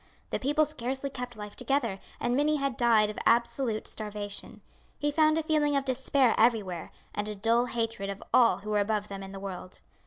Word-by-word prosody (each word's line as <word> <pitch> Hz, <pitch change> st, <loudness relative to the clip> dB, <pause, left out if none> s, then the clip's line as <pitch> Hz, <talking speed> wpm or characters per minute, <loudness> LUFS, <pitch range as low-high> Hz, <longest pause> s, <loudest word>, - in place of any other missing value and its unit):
The -, -, -1 dB
people 295 Hz, +3 st, +2 dB
scarcely 270 Hz, -1 st, -4 dB
kept 250 Hz, -2 st, -6 dB
life 210 Hz, -1 st, -8 dB
together, 235 Hz, -8 st, 0 dB, 0.2 s
and 240 Hz, +1 st, 0 dB
many 295 Hz, +3 st, +3 dB
had 275 Hz, -4 st, -1 dB
died 220 Hz, -3 st, +4 dB
of -, -, -7 dB
absolute 235 Hz, -1 st, +1 dB
starvation. 210 Hz, -2 st, -5 dB, 0.4 s
He 295 Hz, 0 st, 0 dB
found 310 Hz, +1 st, +4 dB
a 320 Hz, -, 0 dB
feeling 300 Hz, -2 st, +2 dB
of 275 Hz, -1 st, +1 dB
despair 265 Hz, -1 st, +2 dB
everywhere, 210 Hz, -7 st, +1 dB, 0.2 s
and 205 Hz, +1 st, -2 dB
a 210 Hz, -, -4 dB
dull 230 Hz, +4 st, +2 dB
hatred 225 Hz, -4 st, -2 dB
of 200 Hz, 0 st, -6 dB
all 230 Hz, -7 st, +6 dB
who 210 Hz, +1 st, -5 dB
were 210 Hz, -, +3 dB
above 210 Hz, 0 st, 0 dB
them 195 Hz, -1 st, -6 dB
in 195 Hz, 0 st, -8 dB
the 195 Hz, -, -7 dB
world. 185 Hz, -2 st, -7 dB
235 Hz, 195 wpm, -29 LUFS, 210-275 Hz, 0.4 s, all